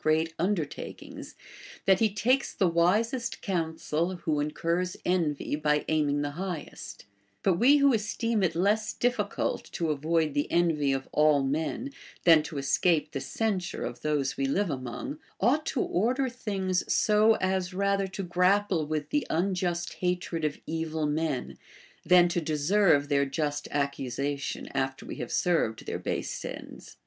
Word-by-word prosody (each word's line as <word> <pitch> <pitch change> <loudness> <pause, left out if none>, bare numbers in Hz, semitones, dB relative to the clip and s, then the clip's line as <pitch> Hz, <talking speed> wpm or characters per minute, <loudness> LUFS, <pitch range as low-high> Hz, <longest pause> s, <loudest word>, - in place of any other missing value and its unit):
great 160 +1 +1
undertakings, 175 -4 -4 0.5
tliat 190 -1 +5
he 220 -2 +3
takes 250 +6 +1
the 190 - +2
wisest 215 +9 +1
counsel 165 -1 -1
who 155 -4 -1
incurs 165 +4 -1
envy 165 -6 0
by 150 0 +1
aiming 145 -2 +1
the 145 - -2
highest 160 - -6 0.2
* 100 0 -42
But 180 -3 +2
we 280 +4 +6
who 280 -2 +4
esteem 225 +1 0
it 175 -4 +1
less 205 +5 +1
difficult 230 -5 -1
to 165 -4 0
avoid 155 +1 0
the 145 0 -1
envy 160 -5 +2
of 135 0 -2
all 150 -2 +4
men 160 - -2 0.3
than 165 -3 +7
to 150 -1 -7
escape 150 +4 +1
the 135 - -4
censure 200 -2 -2
of 120 0 -6
those 150 -3 0
we 135 - -1
live 190 +5 0
among, 135 - -5 0.2
ought 280 +9 +2
to 260 - 0
order 255 +8 +1
things 195 -7 -2
so 215 +1 +4
as 185 0 -1
rather 200 +1 0
to 195 +1 -5
grapple 180 -1 +2
with 155 -1 -3
the 295 -1 0
un 185 +4 +1
just 175 -1 -2
hatred 180 -2 -2
of 150 -1 -1
evil 160 -1 -2
men, 150 -3 -2 0.4
than 180 -1 +6
to 175 0 0
deserve 155 0 +2
their 140 -1 +2
just 145 0 -2
accusation 140 0 -2
after 135 -1 -2
we - - -7
have - - -5
served 165 -11 0
tlieir - - -4
base - - -3
ends. - - -9
170 Hz, 155 wpm, -28 LUFS, 150-195 Hz, 0.5 s, than